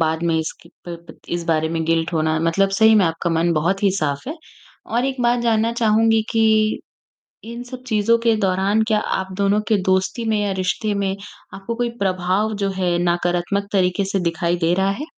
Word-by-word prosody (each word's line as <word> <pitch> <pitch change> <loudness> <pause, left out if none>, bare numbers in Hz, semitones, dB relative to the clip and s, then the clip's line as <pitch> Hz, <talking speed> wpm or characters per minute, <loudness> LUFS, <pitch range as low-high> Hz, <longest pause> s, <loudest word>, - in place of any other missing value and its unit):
बाद 160 0 0
में - - +1
इसके 160 +1 -6 0.2
प 170 - -5
प - - -14
इस 175 0 -3
बारे 160 -1 +1
में 165 0 -2
गिल्ट 165 +1 0
होना। 155 0 0
मतलब 165 +4 +2
सही 220 0 +6
में 210 -3 +5
आपका 165 +1 -2
मन 165 +1 +1
बहुत 170 +6 0
ही 200 - +4
साफ़ 145 - -2
है 310 - -4 0.5
और 240 +2 -1
एक 265 -1 -2
बात 240 0 +2
जानना 230 -1 +1
चाहूँगी 225 -1 +2
कि 220 -1 +2 0.7
इन 235 +1 -7
सब 255 0 -9
चीज़ों 220 +1 +2
के 230 -1 +2
दौरान 195 +2 +1
क्या 215 -2 +2 0.2
आप 190 0 -5
दोनों 200 +1 +2
के 220 - +3
दोस्ती 190 +4 0
में 215 - +1
या 200 -1 -1
रिश्ते 190 +3 -1
में, 195 -1 -1 0.4
आपको 195 +4 -5
कोई 240 0 -1
प्रभाव 190 +3 0
जो 195 - +1
है 180 -2 0
नकारात्मक 175 +3 -1
तरीके 185 0 +1
से 195 0 -1
दिखाई 170 +1 -1
दे 175 - +3
रहा 190 +1 +1
है? 250 +9 -4
195 Hz, 200 wpm, -20 LUFS, 175-220 Hz, 0.7 s, सही